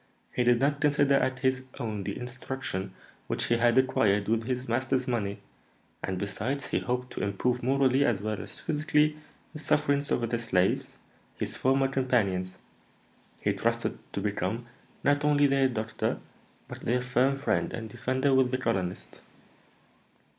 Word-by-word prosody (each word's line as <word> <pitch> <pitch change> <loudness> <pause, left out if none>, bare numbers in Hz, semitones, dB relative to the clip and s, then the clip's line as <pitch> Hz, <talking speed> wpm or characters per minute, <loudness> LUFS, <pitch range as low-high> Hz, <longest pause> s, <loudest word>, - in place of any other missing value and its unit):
He 125 - +1
did 120 -1 +4
not 140 +2 +1
consider 145 -1 +3
as 130 -2 +1
his 130 -1 +1
own 105 -4 -3
the 100 - -3
instruction 125 -6 -5 0.3
which - - 0
he 120 - +2
had 120 +1 +3
acquired 105 -6 +3
with 115 +1 +1
his 125 +1 -2
master's 130 +2 0
money; 105 -5 -1 0.7
and, 95 - -2
besides, 115 +8 -3
he - - +1
hoped 125 0 -3
to - - -4
improve 120 +5 0
morally 135 +1 +3
as 120 -7 +2
well 105 0 -3
as - - -8
physically 150 0 +2 0.4
the 150 - -7
sufferings 145 -2 +1
of 120 - +1
the 120 0 -1
slaves, 95 -5 0 0.4
his - - -3
former 135 +1 +2
companions; 105 -9 0 0.8
he - - +1
trusted - - -1
to 100 - -2
become 105 +3 -2 0.4
not 145 +1 +3
only 145 -1 +4
their 135 -1 +3
doctor, 110 -2 -2 0.5
but - - -8
their 125 +1 0
firm 125 +2 +2
friend 140 - 0
and 115 -1 -5
defender 130 +4 0
with 130 -1 +4
the 130 - 0
colonist." 90 - -3
125 Hz, 155 wpm, -28 LUFS, 110-135 Hz, 0.8 s, did